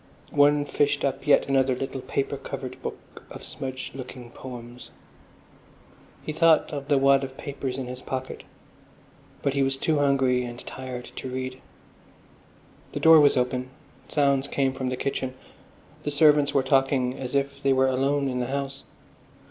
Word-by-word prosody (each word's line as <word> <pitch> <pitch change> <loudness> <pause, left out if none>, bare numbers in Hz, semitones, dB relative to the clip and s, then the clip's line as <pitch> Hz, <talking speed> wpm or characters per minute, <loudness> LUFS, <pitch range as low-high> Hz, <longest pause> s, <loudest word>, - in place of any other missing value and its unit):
One 145 0 +4
fished 145 0 +1
up 135 +1 -3
yet 145 - +5
another 135 -1 +2
little 135 +1 -4
paper 135 - -2
covered - - -7
book - - -8
of - - -10
smudged 130 -1 -6
looking 125 -2 -9
poems.... 120 -1 -10 1.4
He 155 - -3
thought 165 0 +4
of 140 -1 -5
the 145 -2 +3
wad 135 0 +4
of 130 0 -7
papers 135 -2 -4
in 135 - -3
his 125 +1 -7
pocket, 130 0 -5 1.0
but 140 - +1
he 140 - +1
was 135 0 +1
too 155 +2 +1
hungry 135 -3 +2
and 120 -1 -6
tired 130 -2 -7
to 130 - -5
read. 130 0 -5 1.3
The - - -2
door 160 -1 +8
was 145 -2 +5
open; 125 0 -1 0.4
sounds 140 -2 +2
came 135 -2 0
from 130 -1 -3
the 130 - -3
kitchen. 130 -1 -3 0.7
The - - -3
servants 145 -1 +4
were 140 -2 +2
talking 135 -1 +2
as 130 +1 -4
if 140 0 -1
they 135 - +2
were 130 0 +4
alone 135 +2 +1
in 125 -1 -2
the 125 - -1
house. 135 0 -4
135 Hz, 165 wpm, -26 LUFS, 130-140 Hz, 1.4 s, door